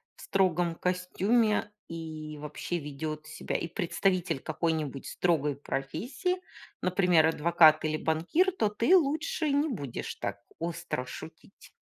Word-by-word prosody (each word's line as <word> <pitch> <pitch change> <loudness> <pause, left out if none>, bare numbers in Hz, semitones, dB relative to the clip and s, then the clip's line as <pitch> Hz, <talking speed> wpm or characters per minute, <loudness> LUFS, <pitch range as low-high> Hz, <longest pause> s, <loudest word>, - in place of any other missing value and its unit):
в - - -15
строгом 175 -3 +1
костюме 205 +5 +1 0.2
и 155 -2 -6
вообще 150 +4 -4
ведет 155 0 -5
себя 155 - -5
и 170 - -3
представитель 175 -2 0
какой-нибудь 155 -3 -2
строгой 150 -5 +1
профессии, 160 - -2 0.5
например, 180 -3 +4
адвокат 160 -1 +5
или 155 0 0
банкир, 170 - +2
то 225 - +1
ты 230 - +4
лучше 310 -1 +1
не 285 +3 +2
будешь 145 - -4
так - - -4 0.2
остро 165 -6 -3
шутить? - - -11
170 Hz, 120 wpm, -29 LUFS, 155-205 Hz, 0.5 s, адвокат